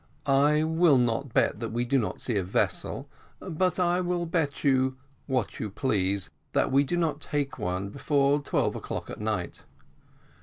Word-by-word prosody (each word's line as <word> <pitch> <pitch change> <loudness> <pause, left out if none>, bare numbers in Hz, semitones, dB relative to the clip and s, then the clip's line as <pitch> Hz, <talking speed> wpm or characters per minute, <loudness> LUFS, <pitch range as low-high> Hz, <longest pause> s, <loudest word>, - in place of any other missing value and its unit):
"I 145 +2 +4
will 160 -2 +4
not 120 +2 0
bet 105 - +2
that 115 -1 -3
we 120 +2 -1
do 135 +2 +2
not 110 - -3
see 120 - -2
a 100 - +1
vessel 90 - -1 0.3
but 180 +2 -1
I'll 175 0 +1
bet 160 -4 -1
you 130 -2 +2 0.3
what 130 -6 -1
you 110 - -3
please, 100 -4 0 0.2
that - - +2
we 135 +1 +5
do 175 +5 -1
not 155 -4 0
take 145 -2 -2
one 90 +2 -2
before 140 +4 +1
twelve - - 0
o'clock - - -5
at - - -7
night." 105 -5 -3
135 Hz, 165 wpm, -27 LUFS, 115-155 Hz, 0.3 s, we